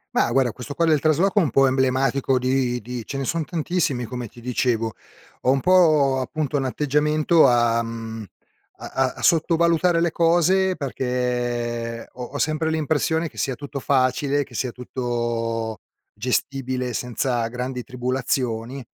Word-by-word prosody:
Ma - - +2
guarda 130 -3 +2
questo 125 +5 -8
qua 170 - +1
del 155 -2 +4
trasloco 170 +8 +2
è - - +4
un 155 - -1
po' 135 0 +4
emblematico 130 0 +1
di 125 -1 0
di 120 +1 -6
ce 140 - -5
ne 135 - -2
sono 165 +4 -1
tantissimi 155 -6 -1
come 125 +1 -5
ti 120 - -15
dicevo. 115 -2 0 0.5
Ho 130 - +3
un 135 - +2
po' 155 -6 +4
appunto 145 +2 -2
un 135 - -1
atteggiamento 150 +4 +2
a, 120 -1 +3
mhmm, 115 -1 -6 0.5
a - - -9
a 130 -1 0
a - - -8
sottovalutare 170 +1 +3
le 170 -1 +1
cose 175 +3 +3
perché 120 -4 -2
ho 125 - -8
ho 135 +4 -6
sempre 155 +1 0
l'impressione 160 +1 0
che - - -20
sia 135 - -1
tutto 140 +2 -6
facile, 140 +2 +1
che 130 -3 -15
sia 125 +2 -1
tutto 120 -3 -3 0.3
gestibile 125 +2 -2
senza 120 0 -1
grandi 125 +1 -4
tribulazioni 125 0 -2
130 Hz, 155 wpm, -23 LUFS, 120-150 Hz, 0.5 s, del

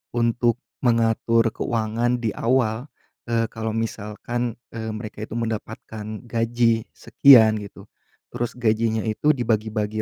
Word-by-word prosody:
untuk 120 0 +2 0.2
mengatur 115 -1 +2
keuangan 115 +2 -1
di 115 -4 -2
awal, 120 +1 0 0.4
eee, 115 -1 +2
kalau 110 0 -3
misalkan, 115 +2 -3 0.2
eee, 110 -1 -4
mereka 110 -1 -7
itu 110 - -8
mendapatkan 110 -1 -5 0.2
gaji 115 -1 +1
sekian 115 -3 +6
gitu, 100 - -11 0.5
terus 120 -1 -3
gajinya 110 -1 +1
itu 110 +7 0
dibagi-bagi 110 -3 -1
115 Hz, 115 wpm, -23 LUFS, 110-120 Hz, 0.5 s, sekian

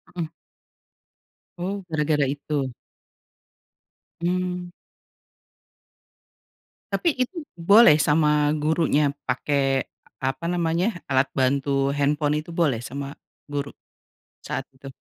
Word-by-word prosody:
Mhm. 165 -3 -3 1.3
Oh, 195 +2 -3
gara-gara 150 -2 +1
itu? 140 -1 -2 1.5
Mmm. 180 0 -1 2.2
Tapi 335 -4 +1
itu 305 +3 -8
boleh 190 0 +7
sama 150 0 +3
gurunya 150 -2 +2
pakai 135 +1 0 0.3
apa 135 +4 -2
namanya, 175 +3 0
alat 135 0 +2
bantu 135 +1 +1
handphone 145 +1 +1
itu 170 - -11
boleh 145 -9 +1
sama 140 +2 -6 0.3
guru, 145 -1 -3 0.7
saat - - -4
itu? 135 +1 -13
150 Hz, 90 wpm, -24 LUFS, 140-170 Hz, 2.2 s, boleh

